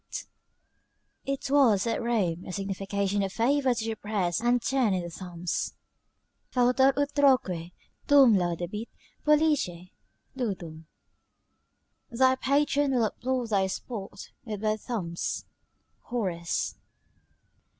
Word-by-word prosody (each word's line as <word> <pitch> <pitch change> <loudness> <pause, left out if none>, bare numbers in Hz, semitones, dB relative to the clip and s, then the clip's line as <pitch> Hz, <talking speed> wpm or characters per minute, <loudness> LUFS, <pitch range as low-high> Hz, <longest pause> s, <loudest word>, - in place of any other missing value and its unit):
] - - -46
It 275 0 -5
was 245 -9 +4
at 230 - -1
Rome 195 -8 0
a - - -5
signification 195 +1 -2
of 195 -1 -1
favour 260 +3 +2
to 225 - -3
depress 205 -5 -1
and 240 +1 +3
turn 240 -5 +1
in 180 - -2
the 170 - -6
thumbs: 175 -1 -4 0.8
"Fautor 255 +2 +4
utroque 285 -6 +3 0.6
tuum 275 -5 +7
laudabit 180 +4 -2 0.4
pollice 295 - +2 0.4
ludum:" 175 -10 -4 1.2
["Thy 260 +1 +4
patron 280 0 +1
will 235 -3 +3
applaud 250 +2 -2
thy 195 -2 +3
sport 195 +1 -7
with 210 -4 -5
both 215 -1 0
thumbs" 175 -9 -3 0.6
Horace. 185 -8 -2
220 Hz, 110 wpm, -28 LUFS, 190-260 Hz, 1.2 s, tuum